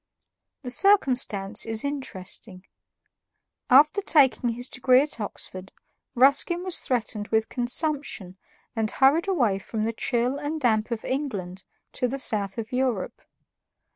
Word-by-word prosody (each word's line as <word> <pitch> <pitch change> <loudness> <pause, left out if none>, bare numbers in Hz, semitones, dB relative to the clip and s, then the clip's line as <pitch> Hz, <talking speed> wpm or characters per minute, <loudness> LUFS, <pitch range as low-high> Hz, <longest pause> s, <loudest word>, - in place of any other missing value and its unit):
The 250 - -3
circumstance 245 - +2
is 225 -1 -2
interesting. 195 -8 -6 1.0
After 300 +9 +6
taking 275 -9 +3
his 245 +2 -5
degree 255 0 +3
at 290 -4 -4
Oxford, 190 -2 -6 0.4
Ruskin 280 +7 +3
was 370 -2 +1
threatened 220 -4 -2
with 220 0 0
consumption 245 - -2 0.4
and 220 -1 0
hurried 285 - +3
away 240 - +1
from 215 +2 -4
the 225 +1 -1
chill 245 +4 -1
and 295 +2 -3
damp 220 -5 +1
of 230 -2 -4
England 200 -10 -4 0.3
to 250 - -1
the 265 +3 -4
south 205 -6 0
of 225 -1 -5
Europe. 250 -6 -2
245 Hz, 130 wpm, -25 LUFS, 215-280 Hz, 1.0 s, After